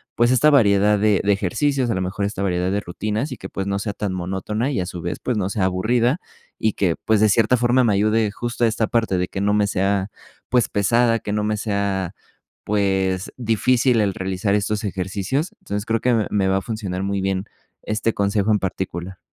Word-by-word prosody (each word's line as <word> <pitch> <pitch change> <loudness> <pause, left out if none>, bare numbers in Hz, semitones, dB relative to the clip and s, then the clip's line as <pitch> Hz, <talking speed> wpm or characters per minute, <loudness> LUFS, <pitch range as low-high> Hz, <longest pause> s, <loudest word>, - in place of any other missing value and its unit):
pues 120 +1 +3
esta 130 +4 +5
variedad 105 -6 +4
de 105 -1 +3
de 100 - +2
ejercicios, 125 - 0
a - - +1
lo 95 - -1
mejor 95 +2 -3
esta 100 -1 -2
variedad 90 -1 0
de 100 - 0
rutinas 105 - -3
y - - -8
que, 95 - -8
pues, 95 0 -4
no 100 0 -1
sea 105 +1 -3
tan 100 -1 -3
monótona 95 +7 -2
y 125 - -1
a 90 - -1
su 90 -1 -7
vez, 85 +1 -4
pues 125 - -2
no 95 -2 -1
sea 100 -1 0
aburrida 120 - +1 0.4
y 110 - +1
que, 90 -5 +1
pues, 110 -1 +3
de 110 - +5
cierta 115 +4 +3
forma 120 +2 +3
me 115 - +3
ayude 105 +1 +2
justo 120 +2 -3
a - - +6
esta 110 0 0
parte 115 -5 +1
de 90 0 0
que 95 - -5
no 100 +1 +2
me 105 0 +3
sea, 95 0 0 0.4
pues, 125 -2 +3
pesada, 115 +3 +2
que 105 - -5
no 105 0 0
me 105 0 0
sea, 100 -3 -2 0.5
pues, 95 -2 0
difícil 120 +1 +2
el 100 -2 +1
realizar 95 +2 -1
estos 105 +1 -1
ejercicios. 100 - -2
Entonces, 105 +1 -4
creo 115 -1 0
que 125 - +2
me 110 -2 +1
me 100 -2 +1
va 95 - +2
a - - -1
funcionar 100 -4 -4
muy 100 0 -1
bien, 95 0 -1 0.4
este 110 +1 -1
consejo 100 +1 +1
en 105 - +3
particular. 95 -1 -4
105 Hz, 220 wpm, -21 LUFS, 95-115 Hz, 0.5 s, a